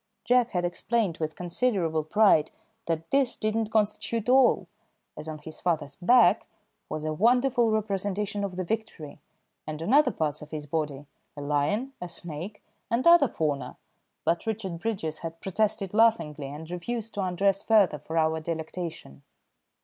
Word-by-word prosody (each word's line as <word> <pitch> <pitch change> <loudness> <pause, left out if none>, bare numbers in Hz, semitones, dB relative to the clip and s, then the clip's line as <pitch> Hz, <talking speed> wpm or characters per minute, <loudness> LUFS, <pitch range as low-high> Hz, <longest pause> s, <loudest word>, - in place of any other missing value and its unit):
Jack 245 -1 +3
had 180 -4 -1
explained 195 0 -1
with 155 -1 -3
considerable 175 -4 0
pride 160 -2 +4 0.4
that 165 -1 -3
this 275 -3 +2
did 215 0 -1
not 225 -1 0
constitute 220 +1 0
all, 260 0 +5 0.5
as 155 - -8
on 155 -1 -5
his 155 +1 -10
father's 150 -5 -1
back 240 +7 +4 0.4
was 155 0 -4
a 155 - -1
wonderful 240 - +3
representation 205 -1 -1
of 195 -2 -3
the 185 - -2
Victory, 175 -8 -5 0.5
and 155 0 -5
on 215 - 0
other 300 +2 +6
parts 150 -2 -2
of 150 - -10
his 155 -2 -6
body 150 -2 -3 0.3
a - - -5
lion, 150 - 0
a 180 - -5
snake, 170 +4 -6 0.3
and 235 +2 0
other 340 -4 +7
fauna, 150 -9 -3 0.5
but 170 +6 0
Richard 195 -6 -3
Bridges 170 -7 -3
had 165 0 -7
protested 195 0 0
laughingly 210 -11 +2
and 155 +4 -8
refused 220 +6 -4
to 205 - -2
undress 195 +2 +1
further 200 -9 +3
for 160 +3 -5
our 160 0 +2
delectation. 160 - -6
180 Hz, 155 wpm, -27 LUFS, 155-220 Hz, 0.5 s, other